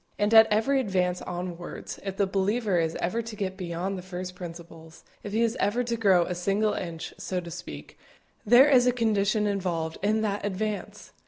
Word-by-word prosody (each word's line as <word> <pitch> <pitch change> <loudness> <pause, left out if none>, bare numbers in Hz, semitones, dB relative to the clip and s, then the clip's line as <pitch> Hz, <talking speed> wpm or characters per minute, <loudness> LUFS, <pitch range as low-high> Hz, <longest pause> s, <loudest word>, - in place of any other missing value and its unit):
And 205 +2 +1
at 220 0 +9
every 225 +6 +2
advance 185 -6 0
onwards, 175 -1 -6
if 195 -1 -5
the 200 - +3
believer 195 0 0
is 160 -1 -1
ever 225 +7 -1
to 230 -1 -8
get 190 -2 -3
beyond 185 +1 -4
the - - -7
first 180 0 -6
principles, 165 -2 -10 0.2
if 205 - -7
he 225 +3 +2
is 230 0 0
ever 215 +5 +1
to 235 -1 -2
grow 195 -6 +4
a - - -3
single 200 +4 0
inch, 165 -2 -5
so 185 - -2
to 170 -1 -8
speak, 75 - -9 0.4
there 245 +6 +7
is 255 -4 +5
a - - +5
condition 215 -2 +1
involved 175 -5 -2
in 215 +2 +1
that 205 -2 -2
advance! 205 +1 -4
195 Hz, 190 wpm, -27 LUFS, 180-215 Hz, 0.4 s, at